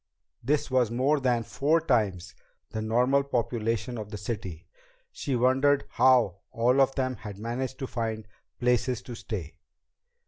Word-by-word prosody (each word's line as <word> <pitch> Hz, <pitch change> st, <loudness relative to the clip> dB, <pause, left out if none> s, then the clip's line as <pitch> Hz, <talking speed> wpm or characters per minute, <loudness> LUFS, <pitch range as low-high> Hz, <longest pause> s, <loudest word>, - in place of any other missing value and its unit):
This 145 Hz, +2 st, 0 dB
was 125 Hz, -3 st, +3 dB
more 135 Hz, +6 st, +2 dB
than 125 Hz, -3 st, +1 dB
four 150 Hz, +7 st, +1 dB
times 105 Hz, -, 0 dB, 0.4 s
the 110 Hz, -, -3 dB
normal 125 Hz, +5 st, +3 dB
population 120 Hz, -3 st, -2 dB
of 105 Hz, -1 st, -6 dB
the 105 Hz, -, -6 dB
city. 95 Hz, -6 st, -5 dB, 0.5 s
She 135 Hz, -, -3 dB
wondered 130 Hz, +2 st, +3 dB
how 120 Hz, -6 st, +4 dB
all 125 Hz, +2 st, +3 dB
of 135 Hz, 0 st, +2 dB
them 130 Hz, -2 st, -1 dB
had 105 Hz, -3 st, -8 dB
managed 120 Hz, +4 st, -4 dB
to 135 Hz, -, -4 dB
find 110 Hz, -3 st, -3 dB, 0.3 s
places 125 Hz, 0 st, +1 dB
to 125 Hz, -, -8 dB
stay. 90 Hz, -8 st, -6 dB
120 Hz, 145 wpm, -27 LUFS, 110-130 Hz, 0.5 s, how